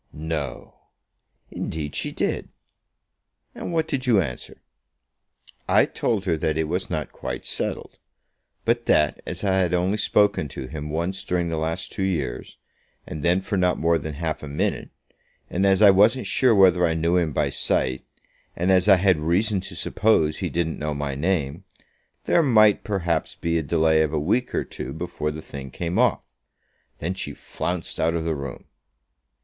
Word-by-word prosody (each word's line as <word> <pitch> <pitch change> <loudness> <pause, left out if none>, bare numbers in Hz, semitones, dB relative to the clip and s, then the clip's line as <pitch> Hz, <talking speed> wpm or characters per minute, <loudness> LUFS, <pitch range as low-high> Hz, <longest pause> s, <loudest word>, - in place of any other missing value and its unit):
"No!" 75 -5 -5 0.7
"Indeed 75 -2 -4
she - - -1
did." - - -2 1.0
"And - - -6
what 160 -1 0
did 135 -3 -2
you 115 -5 +5
answer?" 70 -9 -5 1.1
"I - - +5
told 105 -5 -1
her 85 -4 +1
that 80 0 -1
it 80 -1 0
was 90 +4 -2
not 80 -4 -3
quite - - -6
settled; - - -3 0.7
but 120 +1 +1
that 75 -1 +3
as - - -5
I 95 -2 +2
had 90 -2 +2
only 90 +4 +1
spoken 105 -6 +2
to 65 - -7
him 75 +2 -6
once 85 +5 -2
during 90 -3 -1
the 80 - -2
last 80 +3 -3
two - - -5
years, 80 -10 -2 0.5
and 75 - -6
then 90 +5 +2
for 100 +1 -2
not 90 -1 +2
more 85 0 +2
than 75 0 -6
half 80 0 -3
a 75 - -7
minute, 70 +1 -2 0.6
and 95 +3 +2
as 95 +2 +4
I 100 - +9
wasn't 105 +7 +4
sure 125 -4 +3
whether 90 -3 +5
I 80 -2 +2
knew 85 +2 +2
him 85 -3 +1
by - - 0
sight, 65 0 0 0.5
and 90 +3 +1
as 95 +1 +4
I 100 - +8
had 95 -3 +3
reason 95 +6 +1
to 95 -2 -9
suppose 85 -5 +1
he - - -2
didn't 80 -1 -2
know 75 0 -2
my 70 -1 -3
name, 80 +1 -1 0.6
there 170 - +4
might, 110 -8 +4
perhaps, 85 -6 -1
be 85 0 0
a - - -1
delay 80 +1 +2
of 80 0 0
a 75 - +1
week 110 +11 0
or - - +1
two - - -7
before 75 - -3
the 75 +1 -6
thing 70 -1 -8
came 85 +6 -3
off. - - +3 0.8
Then 85 +4 -3
she 95 - -5
flounced 90 -1 -4
out 80 +1 +1
of 85 - -1
the 80 0 0
room." 70 -3 -7
85 Hz, 180 wpm, -24 LUFS, 75-95 Hz, 1.1 s, I